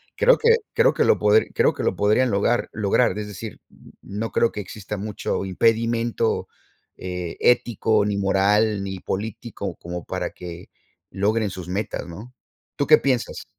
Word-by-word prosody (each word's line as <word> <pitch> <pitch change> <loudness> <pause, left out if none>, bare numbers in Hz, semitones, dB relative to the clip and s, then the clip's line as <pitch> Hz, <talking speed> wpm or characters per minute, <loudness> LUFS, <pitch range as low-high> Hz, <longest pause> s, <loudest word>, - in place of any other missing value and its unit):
creo - - +4
que 465 0 +5 0.2
creo - - +3
que - - +3
lo - - +3
podri 105 +1 +3
creo - - +3
que - - -4
lo - - 0
podrían 110 +4 +2
logar 105 +4 +1
lograr, 105 +3 +2
es 105 - -5
decir, 100 -4 -8
n - - -20
no 105 +3 -5
creo 115 - +2
que 105 - -6
exista 105 +1 -7
mucho 100 -1 -3
impedimento, 115 +3 +1 0.5
eh, 90 -2 -5
ético 110 -3 +3
ni 100 -1 -1
moral 100 +1 +2
ni 95 -1 -5
político 110 +3 -5
como 85 -1 -7
para - - -4
que 85 0 -10 0.4
logren 105 +2 0
sus 90 -2 -8
metas, 95 0 -3
¿no? 105 +9 -10 0.4
¿Tú 145 - -1
qué 155 - +8
piensas? 130 -4 -1
105 Hz, 165 wpm, -23 LUFS, 95-115 Hz, 0.5 s, qué